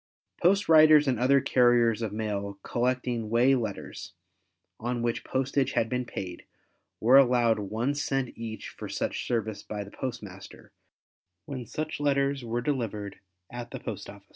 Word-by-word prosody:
Post 195 Hz, +3 st, +3 dB
riders 155 Hz, -2 st, +7 dB
and 125 Hz, -4 st, +1 dB
other 135 Hz, +3 st, +4 dB
carriers 120 Hz, -3 st, +3 dB
of 110 Hz, -3 st, -2 dB
mail 100 Hz, -2 st, -3 dB
collecting 125 Hz, -2 st, -1 dB
way 120 Hz, +4 st, +4 dB
letters 110 Hz, -6 st, -4 dB, 0.7 s
on 120 Hz, +1 st, -2 dB
which 120 Hz, -1 st, -1 dB
postage 135 Hz, +1 st, 0 dB
had 115 Hz, -, +1 dB
been 125 Hz, +1 st, -1 dB
paid, 90 Hz, -5 st, -6 dB, 0.6 s
were 125 Hz, +5 st, +7 dB
allowed 120 Hz, -4 st, +3 dB
1 110 Hz, +7 st, -1 dB
cent 135 Hz, -3 st, -2 dB
each 115 Hz, -1 st, -6 dB
for -, -, -8 dB
such -, -, -3 dB
service 110 Hz, -3 st, -2 dB
by 105 Hz, -1 st, -5 dB
the 100 Hz, -, -13 dB
postmaster 105 Hz, -7 st, -8 dB, 0.7 s
when 130 Hz, -5 st, -6 dB
such 155 Hz, 0 st, -4 dB
letters 140 Hz, -2 st, +1 dB
were 120 Hz, +1 st, -2 dB
delivered 110 Hz, -7 st, -3 dB, 0.3 s
at 120 Hz, 0 st, -6 dB
the -, -, -7 dB
post -, -, -6 dB
office. -, -, -13 dB
120 Hz, 150 wpm, -28 LUFS, 110-135 Hz, 0.7 s, riders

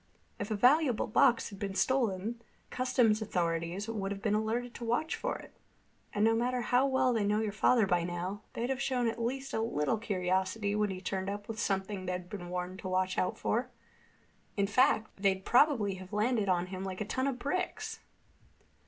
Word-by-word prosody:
If 205 Hz, -, -3 dB
a 215 Hz, -, 0 dB
valuable 255 Hz, +3 st, +4 dB
box 240 Hz, 0 st, +3 dB
had 200 Hz, -, -10 dB
been 195 Hz, -1 st, -3 dB
stolen, 230 Hz, -3 st, 0 dB
the -, -, -26 dB, 0.3 s
customs 245 Hz, -4 st, +3 dB
authorities 175 Hz, 0 st, -1 dB
would 205 Hz, -3 st, -3 dB
have 200 Hz, -, -4 dB
been 215 Hz, -3 st, +1 dB
alerted 230 Hz, +3 st, -1 dB
to -, -, -8 dB
watch 240 Hz, +8 st, 0 dB
for -, -, -2 dB
it. -, -, -13 dB, 0.6 s
And 210 Hz, +1 st, +2 dB
no 225 Hz, -, +4 dB
matter 245 Hz, +2 st, 0 dB
how 245 Hz, +4 st, +3 dB
well 260 Hz, -2 st, +2 dB
they 225 Hz, -3 st, +1 dB
know 210 Hz, +1 st, +2 dB
your 220 Hz, -1 st, -1 dB
father 220 Hz, +2 st, +3 dB
by 175 Hz, -3 st, +1 dB
now, 175 Hz, +4 st, -4 dB
they'd 240 Hz, +3 st, -2 dB
have 265 Hz, 0 st, -2 dB
shown 250 Hz, -3 st, +1 dB
at 230 Hz, +1 st, -2 dB
least 265 Hz, +3 st, -3 dB
a 220 Hz, -, 0 dB
little 220 Hz, -2 st, 0 dB
curiosity 190 Hz, 0 st, 0 dB
when 210 Hz, 0 st, +1 dB
he 185 Hz, -1 st, -5 dB
turned 190 Hz, 0 st, -2 dB
up 205 Hz, +1 st, -5 dB
with 225 Hz, 0 st, -5 dB
something 195 Hz, -2 st, -2 dB
they'd 180 Hz, 0 st, -4 dB
been 180 Hz, -4 st, -6 dB
warned 180 Hz, +1 st, -4 dB
to 185 Hz, -, -6 dB
watch 185 Hz, 0 st, +1 dB
out 180 Hz, -, 0 dB
for. 245 Hz, +3 st, -1 dB, 0.9 s
In 200 Hz, -, +3 dB
fact, 220 Hz, -2 st, +2 dB
they'd 190 Hz, -1 st, +1 dB
probably 240 Hz, -7 st, +4 dB
have 185 Hz, +1 st, -11 dB
landed 215 Hz, -1 st, +1 dB
on 180 Hz, -1 st, +2 dB
him 185 Hz, 0 st, -4 dB
like 190 Hz, -1 st, -5 dB
a -, -, -1 dB
ton 260 Hz, +6 st, -1 dB
of 270 Hz, -3 st, -1 dB
bricks." 370 Hz, -, -3 dB
210 Hz, 200 wpm, -31 LUFS, 190-245 Hz, 0.9 s, valuable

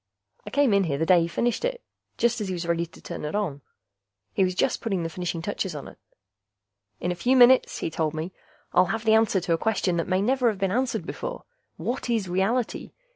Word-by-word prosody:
I -, -, -3 dB
came 280 Hz, -5 st, +3 dB
in 200 Hz, -1 st, +3 dB
here 140 Hz, -4 st, -1 dB
the 160 Hz, -, 0 dB
day 180 Hz, 0 st, +5 dB
he 165 Hz, -, 0 dB
finished 235 Hz, -, -1 dB
it, -, -, -2 dB, 0.3 s
just 235 Hz, -1 st, +1 dB
as 205 Hz, -, -2 dB
he 185 Hz, -, -2 dB
was 170 Hz, 0 st, -4 dB
ready 170 Hz, 0 st, 0 dB
to -, -, -17 dB
turn -, -, -6 dB
it 150 Hz, +5 st, -3 dB
on. 170 Hz, -10 st, -2 dB, 0.7 s
He 195 Hz, -, +2 dB
was 185 Hz, -1 st, 0 dB
just 255 Hz, -, +1 dB
putting 195 Hz, -6 st, -1 dB
the 165 Hz, -, -2 dB
finishing 170 Hz, -1 st, -4 dB
touches 190 Hz, -3 st, -3 dB
on 145 Hz, -, -7 dB
it. -, -, -14 dB, 1.0 s
"In 175 Hz, -, -1 dB
a -, -, 0 dB
few 245 Hz, +10 st, +2 dB
minutes," 250 Hz, +1 st, +6 dB
he -, -, -3 dB
told 155 Hz, -1 st, -1 dB
me, 165 Hz, +4 st, -4 dB, 0.4 s
"I'll 180 Hz, -, +5 dB
have 225 Hz, +4 st, -3 dB
the 220 Hz, -, +5 dB
answer 220 Hz, -3 st, +4 dB
to 170 Hz, -, 0 dB
a 165 Hz, -, 0 dB
question 195 Hz, -5 st, 0 dB
that 165 Hz, -, -1 dB
may 185 Hz, 0 st, +1 dB
never 255 Hz, +2 st, +2 dB
have 215 Hz, -, -3 dB
been 195 Hz, -1 st, 0 dB
answered 250 Hz, +4 st, 0 dB
before: -, -, -5 dB, 0.3 s
what 245 Hz, 0 st, -3 dB
is 225 Hz, -5 st, 0 dB
reality? 195 Hz, +7 st, -1 dB
190 Hz, 235 wpm, -26 LUFS, 170-235 Hz, 1.0 s, minutes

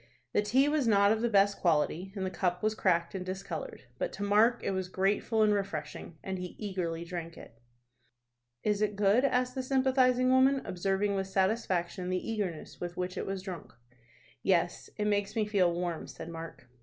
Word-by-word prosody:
The -, -, +3 dB
tea 255 Hz, +7 st, +3 dB
was 295 Hz, -4 st, +1 dB
not 200 Hz, -2 st, +5 dB
of 220 Hz, 0 st, +1 dB
the 235 Hz, -, +1 dB
best 200 Hz, -1 st, +3 dB
quality, 170 Hz, +2 st, +1 dB
and 190 Hz, -2 st, -2 dB
the 185 Hz, -, -3 dB
cup 180 Hz, 0 st, -1 dB
was 215 Hz, 0 st, +2 dB
cracked 170 Hz, -5 st, +1 dB
and 190 Hz, -2 st, -4 dB
discolored; 185 Hz, -3 st, -6 dB, 0.2 s
but -, -, -1 dB
to 205 Hz, -, -5 dB
Mark 215 Hz, +4 st, +3 dB
it -, -, 0 dB
was 190 Hz, -1 st, -2 dB
grateful 205 Hz, +4 st, +1 dB
and 210 Hz, -1 st, +4 dB
refreshing, 170 Hz, -5 st, -4 dB
and 190 Hz, -1 st, -4 dB
he 180 Hz, -1 st, -6 dB
eagerly 175 Hz, -5 st, -3 dB
drank 170 Hz, -1 st, -6 dB
it. 115 Hz, -, -13 dB, 1.0 s
"Is 210 Hz, -1 st, +1 dB
it 210 Hz, -1 st, +1 dB
good?" 205 Hz, +5 st, +3 dB
asked 255 Hz, -2 st, +1 dB
the 260 Hz, -, -2 dB
sympathizing 255 Hz, -1 st, +3 dB
woman, 265 Hz, +1 st, +4 dB
observing 195 Hz, +2 st, 0 dB
with 195 Hz, -1 st, -1 dB
satisfaction 190 Hz, -2 st, 0 dB
the 185 Hz, -, +1 dB
eagerness 195 Hz, -8 st, -4 dB
with 175 Hz, 0 st, -5 dB
which 180 Hz, 0 st, -3 dB
it -, -, -4 dB
was 195 Hz, -1 st, -3 dB
drunk. 180 Hz, -5 st, -7 dB, 0.7 s
"Yes, -, -, +1 dB
it 210 Hz, -, -1 dB
makes 205 Hz, 0 st, 0 dB
me 220 Hz, -2 st, +1 dB
feel 195 Hz, -4 st, +2 dB
warm," 175 Hz, -1 st, -3 dB
said 165 Hz, -, -8 dB
Mark. 165 Hz, -6 st, -8 dB
195 Hz, 190 wpm, -30 LUFS, 180-215 Hz, 1.0 s, not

